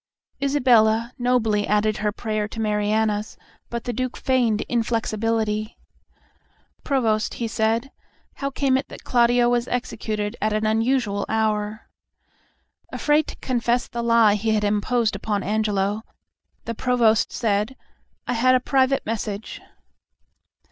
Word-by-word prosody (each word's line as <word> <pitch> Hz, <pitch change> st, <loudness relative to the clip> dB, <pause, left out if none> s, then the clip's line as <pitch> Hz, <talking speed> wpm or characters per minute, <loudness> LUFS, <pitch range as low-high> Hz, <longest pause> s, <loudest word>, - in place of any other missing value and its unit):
Isabella 240 Hz, -4 st, +3 dB
nobly 225 Hz, -4 st, +1 dB
added 210 Hz, +1 st, +1 dB
her 210 Hz, 0 st, 0 dB
prayer 215 Hz, -1 st, -3 dB
to 225 Hz, -, -9 dB
Mariana's, 210 Hz, 0 st, 0 dB, 0.3 s
but 235 Hz, -1 st, -4 dB
the 245 Hz, -, -3 dB
Duke 255 Hz, +2 st, -3 dB
feigned 240 Hz, -5 st, +1 dB
inflexibility. 225 Hz, -2 st, -1 dB, 1.1 s
"Provost," 225 Hz, -6 st, 0 dB
he 235 Hz, -, -3 dB
said, 225 Hz, +4 st, 0 dB, 0.5 s
"how 275 Hz, -, -2 dB
came 270 Hz, -1 st, +1 dB
it 275 Hz, -, -7 dB
that -, -, -11 dB
Claudio 240 Hz, 0 st, +3 dB
as 240 Hz, 0 st, 0 dB
executed 215 Hz, -3 st, -3 dB
at 215 Hz, 0 st, +1 dB
an 215 Hz, 0 st, 0 dB
unusual 220 Hz, -2 st, +1 dB
hour?" 215 Hz, -1 st, -1 dB, 1.0 s
Afraid 300 Hz, +1 st, +2 dB
to -, -, -7 dB
confess 240 Hz, -1 st, 0 dB
the 235 Hz, -, -4 dB
lie 230 Hz, -2 st, +4 dB
he 220 Hz, +2 st, 0 dB
had 210 Hz, -, 0 dB
imposed 210 Hz, +2 st, +1 dB
upon 205 Hz, 0 st, -2 dB
Angelo, 210 Hz, 0 st, 0 dB, 0.6 s
the 230 Hz, -, -3 dB
Provost 230 Hz, -2 st, +2 dB
said, 215 Hz, +2 st, -1 dB, 0.5 s
"I -, -, 0 dB
had 255 Hz, +2 st, +4 dB
a -, -, +4 dB
private 265 Hz, +1 st, +1 dB
message." 215 Hz, -1 st, -4 dB
225 Hz, 125 wpm, -23 LUFS, 215-245 Hz, 1.1 s, lie